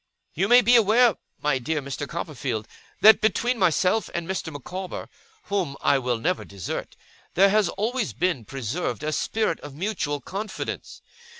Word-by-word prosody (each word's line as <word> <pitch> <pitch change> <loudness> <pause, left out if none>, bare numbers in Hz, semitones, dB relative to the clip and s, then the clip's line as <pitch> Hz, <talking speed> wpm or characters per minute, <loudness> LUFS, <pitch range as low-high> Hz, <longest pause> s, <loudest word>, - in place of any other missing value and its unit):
'You 190 +5 +1
may 245 +2 +7
be 245 0 +5
aware, 230 0 +5 0.3
my 150 -3 +2
dear 155 +5 -1
Mr. 140 +1 -5
Copperfield, 130 -9 -4 0.3
that 220 +1 +8
between 240 +2 +1
myself 185 +4 +2
and 170 -1 -3
Mr. 185 -3 -3
Micawber 180 +6 -6 0.4
(whom 180 -9 -2
I 140 - +3
will 125 -2 -1
never 180 +11 -1
desert), 100 -3 -6 0.4
there 195 +2 +6
has 210 -3 +3
always 220 +4 -1
been 175 -9 -1
preserved 135 +8 -3
a 155 - -1
spirit 215 +1 0
of 145 -2 -10
mutual 155 -5 -2
confidence. 205 +8 -6
180 Hz, 155 wpm, -25 LUFS, 140-210 Hz, 0.4 s, that